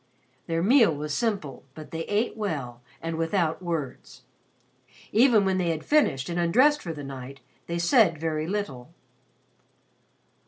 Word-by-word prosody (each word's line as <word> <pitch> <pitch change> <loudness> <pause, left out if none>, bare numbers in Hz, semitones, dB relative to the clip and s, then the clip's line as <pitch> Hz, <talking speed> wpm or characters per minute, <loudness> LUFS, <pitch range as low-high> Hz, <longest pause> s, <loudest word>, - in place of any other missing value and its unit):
'" 130 +1 -39
Their 165 0 -1
meal 225 - +5
was 150 +1 -4
simple 200 - -2
but 155 -1 -10
they 165 0 -4
ate 210 +3 0
well 140 - -4 0.2
and 165 0 -3
without 165 0 0
words. 165 -7 -5 0.9
Even 225 -3 +5
when 190 -1 +1
they 175 -2 0
had 160 -1 -3
finished 150 - +2
and 175 0 -2
undressed 255 - +4
for 170 - -5
the 150 -3 -7
night, 135 0 -8 0.3
they 170 - -2
said 170 - +4
very 155 -1 -2
little. 160 -11 -4
165 Hz, 150 wpm, -26 LUFS, 150-205 Hz, 0.9 s, meal